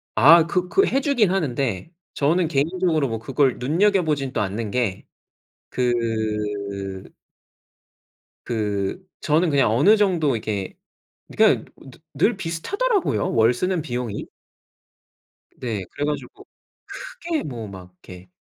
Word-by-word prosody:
아 160 +8 +7
그 180 +1 0
그 390 - +4
해주긴 265 -7 +2
하는데 140 - -2 0.2
저는 165 +5 +2
개인적으로 160 +1 +1
뭐 115 -2 -3
그걸 135 +3 +1
눈여겨보지는 155 -2 +1
또 - - 0
않는 105 +2 -3
게. 115 -6 -1 0.7
그 105 -5 -2 1.4
그 105 - -2 0.2
저는 160 +3 +2
그냥 135 -6 +3
어느 190 - +5
정도 175 - +2
이렇게 105 -3 -4 0.6
그냥 - - +4
느 135 - -14 0.2
늘 195 - +2
비슷하더라고요, 380 - -1
월 115 +1 +4
쓰는 180 +6 -1
비용이? 120 -7 -4 1.3
네 110 -6 -4
그래가지고 145 +1 -4 0.6
크게 345 -11 -4
뭐 120 -6 -6
막 95 -2 -11
이렇게 90 0 -14
135 Hz, 235 characters per minute, -22 LUFS, 110-175 Hz, 1.4 s, 아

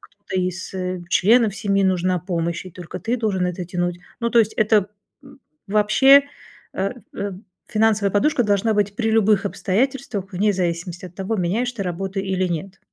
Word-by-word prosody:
кто-то 195 -2 -5
из, 185 +1 -4
э, 185 -1 -3
членов 215 +3 +4
семьи, 200 -3 +1
нужна 185 -1 +1
помощь, 170 -1 -3
и - - -9
только 180 +1 -8
ты 230 +5 -1
должен 200 -6 0
это 180 0 -4
тянуть. 175 0 -2 0.2
Ну, 235 0 0
то 235 - +4
есть 220 -1 0
это, 215 -2 +3 0.3
м, 275 0 -16 0.3
вообще, 265 +7 +6 0.5
э, 195 +1 -1 0.2
эм, 200 0 -5 0.2
финансовая 215 -2 +2
подушка 245 +6 +2
должна 210 +1 +1
быть 205 -1 0
при 225 -2 0
любых 210 -2 +3
обстоятельствах, 210 -1 -2
вне 205 +3 +2
зависимости 175 0 -3
от 180 - -14
того, 195 +4 -2
меняешь 215 +8 0
ты 220 - -4
работу 190 +2 -4
или 190 -1 -1
нет. 185 +3 -5
195 Hz, 170 wpm, -22 LUFS, 185-220 Hz, 0.5 s, вообще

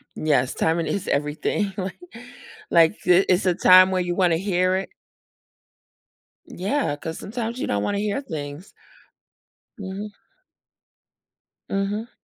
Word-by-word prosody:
Yes, 140 -5 +1
timing 165 0 0
is 200 - -3
everything, 150 +8 -1
like 190 -1 -5 0.7
like, 165 +4 +4
th 180 +2 +4
it's 180 +1 +2
a 180 - +3
time 185 +1 +7
where 185 -1 +1
you 175 -1 -2
wanna 175 -3 +2
hear 185 0 +1
it 190 - -3 1.6
Yeah, 200 - -2
'cause 160 +2 -7
sometimes 235 +2 -5
you - - -2
don't 100 0 -1
wanna 200 0 -1
hear 210 +5 -1
things. 155 - -7 1.0
Mhm. 200 +1 -6 1.6
Mhm. 205 +4 -2
185 Hz, 125 wpm, -23 LUFS, 165-200 Hz, 1.6 s, time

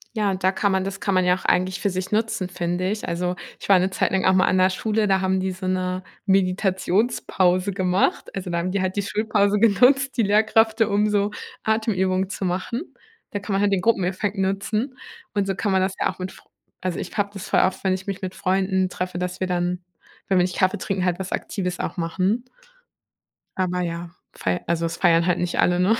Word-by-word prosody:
Ja, 205 -3 +1
da 185 0 +1
kann 200 0 0
man 190 0 +1
das 195 0 -5
kann 200 - -1
man 185 0 +3
ja 180 0 +4
auch 185 - -10
eigentlich 185 +1 +1
für 200 - 0
sich 185 0 -4
nutzen, 210 -4 0
finde 180 +1 -2
ich. 215 0 -4
Also, 180 +1 -2 0.2
ich - - -8
war 195 -2 +7
'ne 185 +1 0
Zeit - - 0
lang 190 -1 +1
auch 190 - +5
mal 185 0 +4
an 185 - +2
'ner 185 0 +5
Schule, 215 +3 0
da 190 -1 +2
haben 190 0 +1
die 190 0 -1
so 185 0 -6
'ne 185 0 -1 0.2
Meditationspause 190 0 +1
gemacht, 185 0 +1
also 185 -2 -4
da 170 - -1
haben 175 +2 -1
die 200 0 0
halt 185 +1 -2
die 200 - +1
Schulpause 210 0 +1
genutzt, 255 +6 +4
die 235 - +3
Lehrkräfte, 220 +1 +3
um 205 +1 +2
so 205 0 +1 0.3
Atemübungen 190 -4 +1
zu 200 - -5
machen. 190 - -3 0.4
Da 205 - -3
kann 200 0 -4
man 195 - +2
halt 205 -1 +2
den 195 - +2
Gruppeneffekt 195 0 0
nutzen 210 +7 -1 0.4
und 200 -2 0
so 195 - -1
kann 205 +1 -1
man 190 0 +3
das 190 0 0
ja - - +2
auch - - -24
mit 185 +1 -4
fr - - -17 0.4
also 185 -2 -1
ich - - -6
habe 205 -1 +1
das 200 0 -8
voll - - +3
oft, 185 0 0
wenn 190 -1 +2
ich 190 +2 -5
mich 195 -1 -4
mit 185 0 -3
Freunden 190 0 +1
treffe, 180 -1 -4
dass 180 0 -3
wir 185 - 0
dann, 180 0 -1 0.4
wenn 190 -2 +3
wir - - +4
nicht 180 0 -2
Kaffee 185 -1 +2
trinken, 190 -2 -1
halt 180 0 0
was 190 0 -5
Aktives 180 -2 -3
auch - - -3
machen. 185 +6 0 1.1
Aber 180 -1 0
ja, 170 0 -4 0.2
fei 90 -1 -2
also 170 0 0
es 165 0 -3
feiern 170 -2 +4
halt 180 -1 +1
nicht 175 -1 -2
alle, 175 0 +3
ne? 195 +5 +4
190 Hz, 230 wpm, -23 LUFS, 180-200 Hz, 1.1 s, war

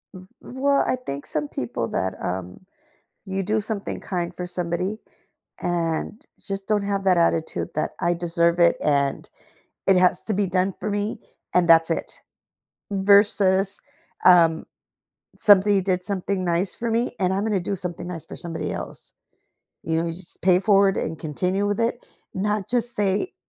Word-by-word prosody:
Mm, 185 0 -12
well, 275 +2 +1
I - - +2
think 140 - -7
some 150 -1 -2
people 120 -3 -3
that, 95 0 -1
um 90 - -5 0.6
you 195 -1 -3
do 215 +3 0
something 210 -1 -4
kind 175 -2 -4
for 180 - -5
somebody 180 +3 -2 0.6
and 170 +3 -2 0.2
just 195 -1 -4
don't 210 -1 +2
have 200 -1 -1
that 185 -2 +4
attitude 165 -1 0
that, 155 - -1
"I 175 0 +2
deserve 170 0 +1
it, 170 -1 +5
and 140 -2 0 0.6
it 195 - +5
has 180 0 +3
to 215 - -1
be 200 +1 +1
done 185 +1 0
for 210 - -2
me, 205 +1 -2 0.3
and 180 -1 +3
that's 165 0 +6
it." 165 - -3 0.7
Versus, 195 -1 +3 0.4
um, 165 -3 +5 0.7
"Something 205 0 +6
you 195 - +2
did 180 -1 0
something 195 -1 -2
nice 175 +2 0
for 235 0 -3
me, 230 +2 0
and 185 -1 +2
I'm 195 +2 0
gonna 210 -4 0
do 185 +3 -2
something 175 -1 -5
nice 170 -3 -7
for - - -9
somebody 170 -2 -4
else." - - -7 0.7
You 160 0 -1
know, 165 - 0
you 165 - -3
just 175 +1 -9
pay 185 0 +5
it 190 - -4
forward 195 -1 +4
and 160 0 -3
continue 180 +6 -1
with 205 +1 -1
it, 235 +1 -1 0.3
not 205 0 -1
just 240 0 0
say, 205 - 0
185 Hz, 170 wpm, -23 LUFS, 170-205 Hz, 0.7 s, that's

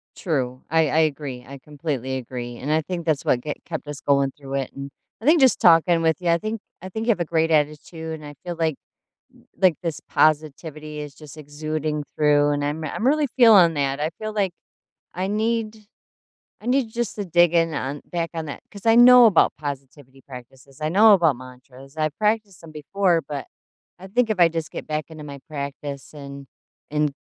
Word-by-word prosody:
True. 130 -7 -2
I 160 -1 +3
I 160 - +2
agree, 140 -5 -2
I 140 0 -10
completely 140 -3 -4
agree. 120 -1 -7
And 145 +4 -4
I 160 +1 +3
think 175 0 -5
that's 155 -4 0
what 120 - +2
get 150 +3 -6
kept 160 -3 -6
us 145 -1 -7
going 140 -1 +2
through 135 -1 -7
it, 135 -2 -2
and 140 0 -6 0.3
I - - -9
think 315 +3 +5
just 260 -2 +5
talking 165 0 +5
with 160 -2 +2
you, 175 - -1
I 170 - +4
think 215 +4 -4 0.2
I 185 - -7
think 220 +4 -4
you - - +5
have 200 - -1
a 170 - 0
great 160 0 +1
attitude, 155 +2 -1
and 155 -1 -8
I 145 - -9
feel 175 -1 -4
like 160 -3 0 0.9
like 185 -4 +5
this 165 -3 -3
positivity 155 0 0
is 145 -2 -8
just 150 0 -13
exuding 150 0 -4
through, 145 -1 +3
and 145 0 -1
I'm 150 +2 -3
I'm 220 - -3
really 295 +1 +3
feeling 200 -9 +7
that. 140 -1 -1
I 155 +2 0
feel 215 0 -4
like 200 -4 0 0.6
I 185 +2 -2
need 220 +1 -1 0.8
I - - -14
need 250 -3 +1
just 235 -2 -2
to 205 - -4
dig 175 -1 +3
in 165 -2 +2
on 140 +1 -4
back 170 -1 -2
on 160 -1 -4
that 140 - -7
'cause 200 +1 -12
I 225 0 +5
know 245 0 +9
about 195 -6 +4
positivity 135 -2 -8
practices, 130 +1 -13
I 155 - 0
know 210 +5 +7
about 165 -8 +3
mantras. 130 +3 -14
I 155 0 +1
practiced 210 +2 -1
them 165 -1 -12
before, 170 +3 +1
but 145 -2 -5 0.5
I 190 - -10
think 235 +3 +1
if 215 -4 -1
I 170 -1 +6
just 165 -1 -4
get - - -7
back 155 0 -2
into 155 -1 -10
my 140 -1 -8
practice 140 -1 -6
and 140 -2 -10 0.4
and 150 -1 0
155 Hz, 205 wpm, -23 LUFS, 140-180 Hz, 0.9 s, know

